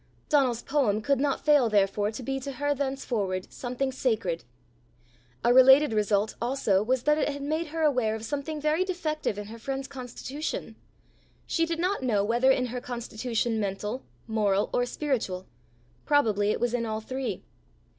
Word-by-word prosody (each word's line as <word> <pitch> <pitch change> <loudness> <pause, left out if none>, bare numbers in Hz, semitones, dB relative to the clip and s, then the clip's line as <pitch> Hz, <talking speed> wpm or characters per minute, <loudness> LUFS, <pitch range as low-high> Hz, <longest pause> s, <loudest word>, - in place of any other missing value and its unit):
Donal's 260 -6 +2
poem 260 -8 +1
could 280 +1 +2
not 280 0 0
fail 290 -6 +5
therefore 205 0 +2
to 255 - -6
be 270 +2 -2
to 275 +1 -6
her 290 +2 0
thenceforward 245 -9 -2
something 255 +2 -2
sacred. 220 -10 -1 1.0
A 240 - +5
related 265 +1 +7
result 210 0 +1
also 235 -6 +1
was 250 +3 0
that 300 +1 +3
it - - +1
had 285 -1 -5
made 315 +3 -1
her 320 +1 -3
aware 250 -7 +2
of 220 0 -6
something 290 +4 -3
very 305 +4 +2
defective 310 - -2
in 205 - -5
her 225 +3 -10
friend's 270 +3 -4
constitution: 265 +3 -5 0.7
she 330 -1 0
did 335 0 -2
not 365 +2 0
know 220 -6 +1
whether 240 +5 +3
in 260 -1 +3
her 250 - -3
constitution 235 -1 -2
mental, 210 +4 -3 0.2
moral, 210 -3 +1
or 245 0 +1
spiritual: 235 -11 -2 0.6
probably 215 -8 +2
it - - 0
was 240 0 0
in 235 -2 0
all 215 0 -2
three. 260 +3 -4
250 Hz, 165 wpm, -27 LUFS, 220-285 Hz, 1.0 s, related